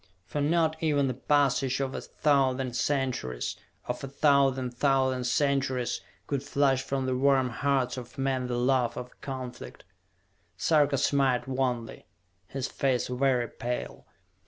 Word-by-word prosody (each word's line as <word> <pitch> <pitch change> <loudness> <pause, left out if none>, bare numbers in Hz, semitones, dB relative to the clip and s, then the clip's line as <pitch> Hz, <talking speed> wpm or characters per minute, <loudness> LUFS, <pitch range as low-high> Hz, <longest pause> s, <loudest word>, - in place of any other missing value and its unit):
For 145 +11 -3
not 160 +1 +1
even 145 -3 +2
the 130 - -1
passage 135 0 +1
of 135 -1 -2
a - - -4
thousand 135 -4 +1
centuries, 130 - -1 0.3
or 125 - 0
a 140 - -5
thousand 135 -2 +2
thousand 130 -1 +1
centuries, 130 -1 0 0.2
could 140 -2 -2
flush 140 -1 +2
from 135 -1 -2
the 130 -1 0
warm 130 -1 +3
hearts 135 -1 0
of 125 -2 -9
men 135 -2 0
the 120 -1 -2
love 125 -1 +1
of 125 0 -8
conflict! 130 -2 -7 0.7
Sarka 145 - +3
smiled 135 -2 +2
wanly, 130 -3 -2 0.4
his 135 +4 -3
face 130 -3 0
very 125 -1 +1
pale. 90 - -5
135 Hz, 135 wpm, -28 LUFS, 125-140 Hz, 0.7 s, warm